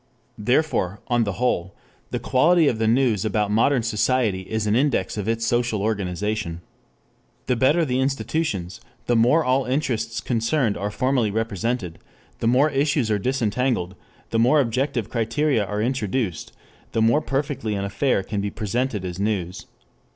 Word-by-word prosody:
Therefore, 105 Hz, -, +1 dB
on 120 Hz, -2 st, +2 dB
the 100 Hz, -, -2 dB
whole, 95 Hz, -6 st, -1 dB, 0.3 s
the -, -, -2 dB
quality 160 Hz, +5 st, +3 dB
of 115 Hz, -5 st, 0 dB
the 110 Hz, -, +1 dB
news 115 Hz, -4 st, +2 dB
about 105 Hz, -2 st, 0 dB
modern 115 Hz, +3 st, +3 dB
society 115 Hz, -3 st, +1 dB
is 110 Hz, +3 st, -3 dB
an 105 Hz, +1 st, +2 dB
index 130 Hz, -7 st, +1 dB
of 105 Hz, -1 st, -4 dB
its 115 Hz, 0 st, 0 dB
social 120 Hz, -3 st, 0 dB
organization. 100 Hz, -3 st, -2 dB, 0.8 s
The 125 Hz, -, +1 dB
better 145 Hz, +8 st, +3 dB
the 130 Hz, -2 st, 0 dB
institutions, 130 Hz, -, -2 dB, 0.2 s
the 120 Hz, -, +1 dB
more 125 Hz, +8 st, +4 dB
all 130 Hz, +1 st, +2 dB
interests 115 Hz, -5 st, -1 dB
concerned 115 Hz, +1 st, 0 dB
are 100 Hz, -, -3 dB
formally 130 Hz, 0 st, +1 dB
represented, 110 Hz, -3 st, -2 dB, 0.4 s
the 115 Hz, -, 0 dB
more 135 Hz, +6 st, +4 dB
issues 140 Hz, -4 st, +1 dB
are 105 Hz, -, +1 dB
disentangled, 120 Hz, -4 st, 0 dB, 0.4 s
the 115 Hz, -, +1 dB
more 125 Hz, +6 st, +4 dB
objective 130 Hz, -2 st, 0 dB
criteria 115 Hz, +2 st, 0 dB
are 105 Hz, +1 st, -2 dB
introduced, 115 Hz, -, -2 dB, 0.4 s
the 115 Hz, -, +1 dB
more 120 Hz, +7 st, +4 dB
perfectly 135 Hz, -6 st, -2 dB
an 100 Hz, 0 st, -2 dB
affair 100 Hz, +2 st, 0 dB
can 100 Hz, +1 st, -3 dB
be 100 Hz, -, -2 dB
presented 110 Hz, 0 st, -2 dB
as 90 Hz, 0 st, -5 dB
news. 95 Hz, -3 st, -2 dB
115 Hz, 155 wpm, -23 LUFS, 105-130 Hz, 0.8 s, more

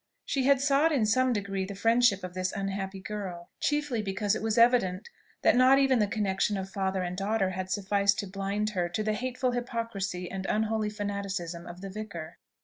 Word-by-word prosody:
She 270 Hz, -2 st, 0 dB
had 280 Hz, -1 st, +5 dB
sought 285 Hz, +3 st, +3 dB
in 260 Hz, -8 st, +2 dB
some 255 Hz, +4 st, +3 dB
degree 195 Hz, -3 st, -2 dB
the 195 Hz, +1 st, -6 dB
friendship 225 Hz, -1 st, +3 dB
of 180 Hz, -1 st, -6 dB
this 185 Hz, 0 st, -1 dB
unhappy 195 Hz, -1 st, -3 dB
girl, 190 Hz, -4 st, -6 dB
chiefly 295 Hz, -6 st, 0 dB
because 200 Hz, 0 st, -1 dB
it 220 Hz, -, -2 dB
was 220 Hz, 0 st, -1 dB
evident 230 Hz, -5 st, +3 dB, 0.3 s
that -, -, +5 dB
not 255 Hz, +2 st, +6 dB
even 270 Hz, -3 st, +4 dB
the 210 Hz, -, +3 dB
connexion 200 Hz, -1 st, 0 dB
of 190 Hz, 0 st, -5 dB
father 190 Hz, -1 st, -1 dB
and 180 Hz, 0 st, -3 dB
daughter 195 Hz, 0 st, 0 dB
had 185 Hz, 0 st, -4 dB
sufficed 200 Hz, +1 st, +2 dB
to 200 Hz, -, -7 dB
blind 200 Hz, +2 st, -2 dB
her 180 Hz, -4 st, -1 dB
to 215 Hz, +5 st, -2 dB
the 215 Hz, 0 st, 0 dB
hateful 255 Hz, +2 st, -1 dB
hypocrisy 230 Hz, -7 st, -3 dB
and 190 Hz, 0 st, -4 dB
unholy 220 Hz, 0 st, 0 dB
fanaticism 200 Hz, -5 st, -4 dB
of 175 Hz, +1 st, -9 dB
the 195 Hz, -, -6 dB
vicar. 195 Hz, -6 st, -7 dB
205 Hz, 195 wpm, -29 LUFS, 190-230 Hz, 0.3 s, not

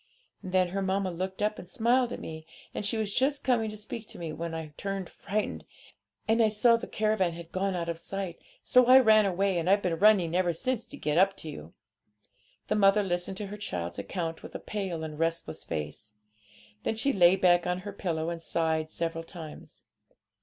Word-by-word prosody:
And 185 Hz, -, -7 dB
then 185 Hz, -1 st, +3 dB
her 195 Hz, +2 st, -2 dB
mamma 190 Hz, 0 st, 0 dB
looked 185 Hz, +3 st, -4 dB
up 210 Hz, 0 st, 0 dB
and 180 Hz, -, -9 dB
smiled 240 Hz, +5 st, +2 dB
at -, -, -5 dB
me; 160 Hz, 0 st, -8 dB, 0.3 s
and -, -, -3 dB
she 210 Hz, +2 st, 0 dB
was 210 Hz, -2 st, -2 dB
just 275 Hz, +2 st, +1 dB
coming 235 Hz, -4 st, +2 dB
to 215 Hz, -, -8 dB
speak 215 Hz, +1 st, -7 dB
to -, -, -8 dB
me 165 Hz, -2 st, -5 dB
when 165 Hz, +1 st, -4 dB
I 160 Hz, -2 st, -6 dB
turned 195 Hz, 0 st, -4 dB
frightened, 205 Hz, +2 st, -3 dB, 0.6 s
and 225 Hz, +1 st, +3 dB
I 220 Hz, -, +6 dB
saw 230 Hz, +3 st, +4 dB
the 230 Hz, -, -4 dB
caravan 215 Hz, -5 st, +1 dB
had 170 Hz, 0 st, -10 dB
gone 190 Hz, 0 st, -1 dB
out 170 Hz, -1 st, -2 dB
of 170 Hz, -1 st, -3 dB
sight; 195 Hz, 0 st, -5 dB, 0.2 s
so 250 Hz, -2 st, +5 dB
I 255 Hz, +1 st, +9 dB
ran 215 Hz, -5 st, +6 dB
away, 190 Hz, -1 st, +1 dB
and 170 Hz, +2 st, -1 dB
I've 200 Hz, +1 st, +4 dB
been 170 Hz, -3 st, -1 dB
running 190 Hz, -5 st, +5 dB
ever 180 Hz, -1 st, +2 dB
since 245 Hz, +7 st, -2 dB
to -, -, -8 dB
get 150 Hz, +2 st, +1 dB
up 195 Hz, +1 st, +4 dB
to 160 Hz, -, -7 dB
you.' 80 Hz, -, -10 dB, 0.9 s
The -, -, 0 dB
mother 205 Hz, 0 st, +4 dB
listened 180 Hz, 0 st, -2 dB
to 210 Hz, -, -4 dB
her -, -, -6 dB
child's 85 Hz, -, -4 dB
account 165 Hz, -, -4 dB
with -, -, -11 dB
a -, -, -3 dB
pale 190 Hz, -6 st, -4 dB
and 155 Hz, -1 st, -6 dB
restless 165 Hz, 0 st, -2 dB
face. 75 Hz, +8 st, -6 dB, 0.7 s
Then -, -, -1 dB
she 265 Hz, +5 st, +1 dB
lay 180 Hz, -1 st, +6 dB
back 180 Hz, -2 st, +4 dB
on 180 Hz, 0 st, -1 dB
her 205 Hz, +1 st, -7 dB
pillow 170 Hz, -4 st, -2 dB
and 170 Hz, -1 st, -5 dB
sighed 160 Hz, -1 st, 0 dB
several 165 Hz, 0 st, -3 dB
times. 165 Hz, -2 st, -11 dB
185 Hz, 210 wpm, -29 LUFS, 165-210 Hz, 0.9 s, I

